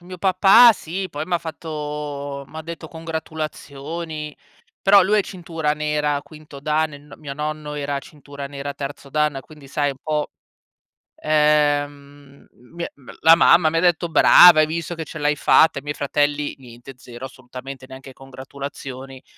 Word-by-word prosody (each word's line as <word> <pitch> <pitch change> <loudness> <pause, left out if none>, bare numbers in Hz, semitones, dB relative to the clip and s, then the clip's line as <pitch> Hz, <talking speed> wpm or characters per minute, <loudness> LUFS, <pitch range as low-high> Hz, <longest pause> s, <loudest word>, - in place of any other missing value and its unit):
mio 180 +1 -10
papà 195 +6 +6
sì, 190 -1 -5
poi 145 -1 -5
m' 185 - -14
ha - - +2
fatto 150 -3 -6
m'ha 160 - -8
detto 165 0 -8
congratulazioni, 155 -1 -6 0.5
però 200 0 +6
lui 210 +3 +2
è - - +3
cintura 165 -5 -3
nera 150 -1 -1
quinto 150 -2 -13
Dan, 155 +2 0
e - - -10
n 145 0 -19
mio 145 -2 -7
nonno 150 0 -5
era 145 -1 -3
cintura 140 -1 -10
nera 140 0 -6
terzo 140 0 -7
Dan, 150 -1 0
quindi 145 +1 -16
sai 145 +1 0
un 135 - -10
po', 150 -1 -2 0.9
ehm, 145 -2 0 0.3
mi 170 0 -4
m 135 -3 -14
la 160 +1 +8
mamma 170 -1 +5
mi 165 - -2
ha - - +4
detto: 175 0 +1
"Brava 165 +1 +8
hai 155 - +5
visto 165 +2 -4
che 160 -1 -6
ce 155 - -9
l'hai 150 0 0
fatta." 160 +1 +4
I - - -14
miei 145 0 -4
fratelli 145 +1 -1
niente, 125 0 -13
zero 125 0 -10
assolutamente, 130 +1 -10
neanche 130 0 -11
congratulazioni, 135 0 -9
150 Hz, 165 wpm, -21 LUFS, 140-160 Hz, 0.9 s, la